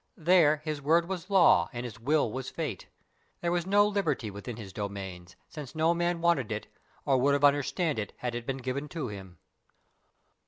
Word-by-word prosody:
There 155 -3 +4
his 155 -2 -3
word 165 +4 +3
was 185 -1 -5
law, 170 - +5
and 120 0 -5
his 115 -4 -8
will 140 -1 +1
was 130 +2 -5
fate. - - -5 0.5
There 170 - 0
was 175 0 -1
no 205 +1 +5
"liberty" 190 - -1
within 100 +4 -7
his 100 -5 -9
domains, 95 -3 -6
since 150 -1 -9
no 160 +2 +3
man 175 0 -1
wanted 165 -10 +2
it, 110 0 -3 0.4
or 135 -2 +3
would 140 +2 +3
have 145 - -2
understood 145 +1 +2
it 105 - -4
had 125 -1 -3
it 120 0 -5
been 135 -1 -2
given 135 +3 -4
to 160 -8 -4
him. 95 -4 -10
140 Hz, 190 wpm, -29 LUFS, 115-170 Hz, 0.5 s, law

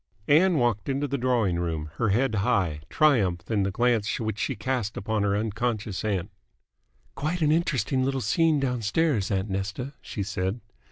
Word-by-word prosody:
Ann 170 +4 +5
walked 120 -2 0
into 140 +2 0
the 140 -1 -2
drawing 115 -8 +1
room, 80 -3 -3
her 110 - +1
head 120 +4 +2
high, 95 -9 +1
triumph 100 - +2
in 105 -2 +2
the 95 - +1
glance 115 +1 +1
which 110 -2 -3
she 135 - -1
cast 115 -1 -2
upon 110 +1 -1
her 100 0 +1
unconscious 110 -1 -2
aunt. 100 -3 -1 0.8
"Quite 160 +4 -2
an 150 - +4
interesting 135 -6 +1
little 135 0 0
scene 155 +7 +2
downstairs, 125 - 0
aunt 95 +1 -1
Nesta," 100 +8 -3
she 100 - -4
said. 95 +2 -2
110 Hz, 165 wpm, -26 LUFS, 100-135 Hz, 0.8 s, Ann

